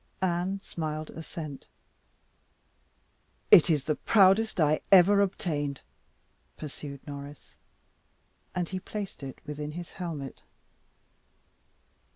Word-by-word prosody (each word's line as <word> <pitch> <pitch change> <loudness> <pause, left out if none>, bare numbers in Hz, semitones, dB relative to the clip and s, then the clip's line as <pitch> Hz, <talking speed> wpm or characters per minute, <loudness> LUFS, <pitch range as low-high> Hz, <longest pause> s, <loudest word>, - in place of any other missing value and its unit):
Anne 185 +2 0
smiled 155 -1 -4
assent. 155 -3 -8 1.8
"It 170 - +9
is 150 -4 +2
the 155 - +1
proudest 195 +6 +4
I 155 -1 +3
ever 200 +2 +7
obtained," 150 -8 -1 0.8
pursued 140 -2 -8
Norris. 145 0 -9 1.0
And 180 -2 0
he 185 +1 -4
placed 200 -3 -6
it 135 -1 -7
within 150 0 -5
his 175 +1 -7
helmet. 160 -7 -6
160 Hz, 95 wpm, -29 LUFS, 145-185 Hz, 1.8 s, It